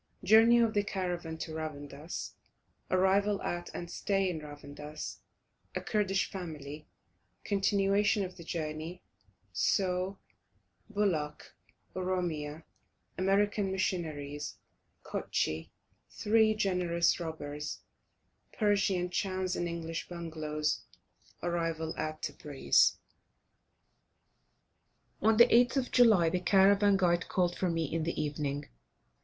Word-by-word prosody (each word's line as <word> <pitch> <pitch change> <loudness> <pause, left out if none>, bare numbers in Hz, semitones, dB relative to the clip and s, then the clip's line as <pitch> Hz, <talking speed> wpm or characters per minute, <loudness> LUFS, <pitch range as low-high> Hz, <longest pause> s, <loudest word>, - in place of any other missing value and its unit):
JOURNEY 225 +2 +7
OF 230 -2 +3
THE 205 - +2
CARAVAN 175 -5 -3
TO 160 0 -5
RAVANDUS 150 0 -6 0.6
ARRIVAL 195 +2 +3
AT 175 0 -3
AND 175 0 -6
STAY 195 -1 0
IN 160 - -4
RAVANDUS 150 0 -8 0.6
A - - -1
KURDISH 195 -3 0
FAMILY 155 -5 -7 0.6
CONTINUATION 200 +1 +2
OF 180 - -9
THE 170 - -10
JOURNEY 160 +2 -5 0.5
SAUH 185 - +1 0.7
BULAK 175 -9 -1 0.4
OROMIA 170 -5 -2 0.6
AMERICAN 200 +1 +2
MISSIONARIES 155 -6 -3 0.5
KUTSCHIE 80 +1 -2 0.4
THREE 215 0 +3
GENEROUS 180 -5 +1
ROBBERS 150 -3 -5 0.7
PERSIAN 200 -4 +1
CHANS 185 -1 -1
AND 175 - -1
ENGLISH 165 -1 -4
BUNGALOWS 155 -3 -2 0.6
ARRIVAL 165 -2 -1
AT 155 0 -4
TEBRIS. 135 - +2 2.2
On 220 +1 +4
the 235 - +10
8th 245 +3 +4
of 255 -2 -1
July 220 -9 +6
the 180 +3 +1
caravan 200 +2 +5
guide 175 -2 +2
called 175 -2 +1
for 185 - 0
me 165 -1 0
in 165 +3 -2
the 165 +2 -2
evening. 145 -1 -2
175 Hz, 105 wpm, -31 LUFS, 155-195 Hz, 2.2 s, the